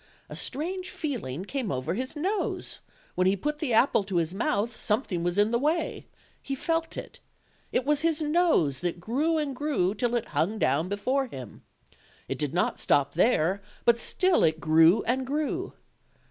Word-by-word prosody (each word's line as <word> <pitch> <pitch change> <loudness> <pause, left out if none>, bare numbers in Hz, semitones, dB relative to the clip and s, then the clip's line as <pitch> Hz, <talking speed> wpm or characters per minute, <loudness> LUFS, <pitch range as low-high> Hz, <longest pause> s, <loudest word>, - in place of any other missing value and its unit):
A - - -7
strange 360 +7 -2
feeling 205 - -4
came 255 -1 -3
over 135 +5 -2
his 255 +8 -4
nose: 380 +8 -2 0.3
when 185 0 +2
he 190 - +3
put 295 +9 -3
the 300 -5 -2
apple 225 -1 +4
to 195 -2 -5
his 170 0 +1
mouth 215 +2 -1
something 210 -5 -1
was 175 +2 -1
in 205 +2 +3
the 235 - +2
way; 310 +5 -1 0.3
he 275 - -4
felt 330 +3 -2
it: - - -8 0.5
it 255 - 0
was 295 0 +2
his 325 -1 +1
nose, 300 - +2
that 175 +1 -3
grew 285 - 0
and 290 -3 -2
grew 260 -10 0
till 240 +3 -1
it 235 -1 -2
hung 160 +9 0
down 160 0 +1
before 255 +7 0
him. 130 - -9 0.7
It - - -4
did 150 -3 -1
not 175 - 0
stop 140 -1 +2
there, 185 0 +2 0.2
but 235 -1 +5
still 370 +7 +3
it 160 0 +2
grew 160 +4 +5
and 255 +3 0
grew. 305 +7 -2
235 Hz, 175 wpm, -27 LUFS, 175-295 Hz, 0.7 s, but